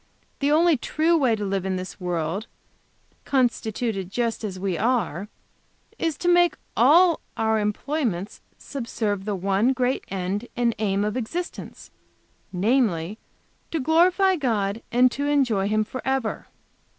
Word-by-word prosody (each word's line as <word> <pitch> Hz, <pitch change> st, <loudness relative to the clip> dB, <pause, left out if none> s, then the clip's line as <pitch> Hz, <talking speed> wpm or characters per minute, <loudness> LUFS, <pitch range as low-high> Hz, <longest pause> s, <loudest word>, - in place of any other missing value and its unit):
The 280 Hz, -, +1 dB
only 325 Hz, 0 st, +4 dB
true 315 Hz, +7 st, +1 dB
way 260 Hz, -8 st, +3 dB
to 210 Hz, -1 st, -4 dB
live 195 Hz, -1 st, -1 dB
in 190 Hz, -1 st, -1 dB
this 185 Hz, +1 st, -6 dB
world, 180 Hz, +3 st, -2 dB, 0.8 s
constituted 225 Hz, -6 st, -1 dB
just 230 Hz, +2 st, -2 dB
as 190 Hz, -3 st, -4 dB
we 190 Hz, -1 st, -1 dB
are, 210 Hz, -4 st, 0 dB, 0.7 s
is 325 Hz, -2 st, -1 dB
to 350 Hz, -, -3 dB
make 350 Hz, 0 st, +4 dB, 0.2 s
all 325 Hz, +8 st, +5 dB, 0.2 s
our 220 Hz, 0 st, +2 dB
employments 210 Hz, -, -2 dB, 0.2 s
subserve 220 Hz, -7 st, -3 dB
the 210 Hz, -2 st, -1 dB
one 195 Hz, +7 st, +1 dB
great 255 Hz, 0 st, 0 dB
end 195 Hz, +4 st, -3 dB
and 240 Hz, -1 st, +2 dB
aim 200 Hz, -1 st, +1 dB
of 210 Hz, +1 st, -2 dB
existence, 330 Hz, +9 st, -5 dB, 0.6 s
namely, 200 Hz, -2 st, +1 dB, 0.5 s
to 325 Hz, -, -2 dB
glorify 355 Hz, +6 st, +3 dB
God 220 Hz, -6 st, -1 dB
and 250 Hz, +1 st, +4 dB
to 285 Hz, +3 st, -2 dB
enjoy 245 Hz, -9 st, +2 dB
Him 215 Hz, +1 st, +2 dB
forever. 255 Hz, +1 st, -3 dB
225 Hz, 135 wpm, -24 LUFS, 195-275 Hz, 0.8 s, all